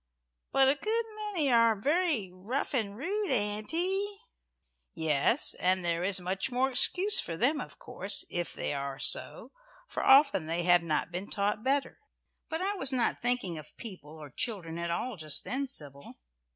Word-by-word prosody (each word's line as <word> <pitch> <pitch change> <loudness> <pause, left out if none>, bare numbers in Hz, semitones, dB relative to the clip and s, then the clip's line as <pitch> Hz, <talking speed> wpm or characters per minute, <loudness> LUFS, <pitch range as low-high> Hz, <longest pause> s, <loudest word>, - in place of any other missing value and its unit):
But 270 0 +4
a 270 - +5
good 445 +9 -2 0.3
many 305 -8 0
are 230 -3 +4
very 290 - 0
rough 215 +12 -4
and 210 -6 -2
rude, 395 - -2
Auntie?" 265 - 0 0.9
"Yes, 160 - +2
and 185 0 +1
there 170 0 0
is 190 0 +1
much 185 +5 -3
more 260 +2 0
excuse 380 +10 +4
for 165 - -5
them, 275 - +1
of - - -10
course, 195 +2 -2
if 175 -1 -3
they - - -3
are 140 -1 -4
so, - - 0 0.4
for - - -4
often 270 - +5
they 170 +2 -1
have 175 0 +5
not 160 0 -2
been 180 +3 -5
taught 210 +1 -1
better. 270 +1 0 0.5
But 320 +3 -3
I 400 +2 0
was 270 -6 +3
not 250 -2 0
thinking 240 -9 -1
of 150 0 -14
people 160 -8 -10
or 150 -3 -11
children 180 - -3
at 170 0 -3
all 215 +6 -3
just 155 -2 +1
then, 275 +2 -3
Sybil. 140 - -1
210 Hz, 170 wpm, -30 LUFS, 170-275 Hz, 0.9 s, a